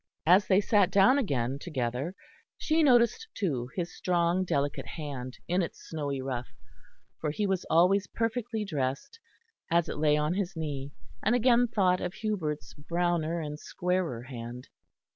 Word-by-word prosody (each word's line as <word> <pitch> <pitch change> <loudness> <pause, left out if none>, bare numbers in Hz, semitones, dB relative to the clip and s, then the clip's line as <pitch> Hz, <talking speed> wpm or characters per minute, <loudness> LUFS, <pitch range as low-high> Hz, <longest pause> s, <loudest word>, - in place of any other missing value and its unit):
As 185 +5 +5
they 195 +1 +5
sat 205 -2 +3
down 200 +8 +5
again 135 - -1
together, 135 +2 -3 0.4
she 320 +1 +2
noticed, 255 - +4
too, 130 - -1
his 175 -2 -3
strong 175 0 +1
delicate 145 -5 -1
hand 135 -5 -6
in 180 +2 +2
its 170 - -4
snowy 140 -4 -3
ruff, 125 -2 -3 0.7
for 155 - -1
he 205 +8 -1
was 190 -2 -1
always 185 +4 +4
perfectly 225 -1 -2
dressed, 145 - -3 0.5
as 170 0 +2
it - - -4
lay 150 -1 +4
on 150 +2 +1
his 190 -1 -2
knee; 145 -3 -4 0.3
and 220 +4 +2
again 245 0 +4
thought 185 -5 +2
of 180 - -3
Hubert's 180 -9 -3
browner 170 +1 -1
and 150 -1 -5
squarer 180 -11 -2
hand. 125 -1 -8
170 Hz, 150 wpm, -29 LUFS, 145-200 Hz, 0.7 s, As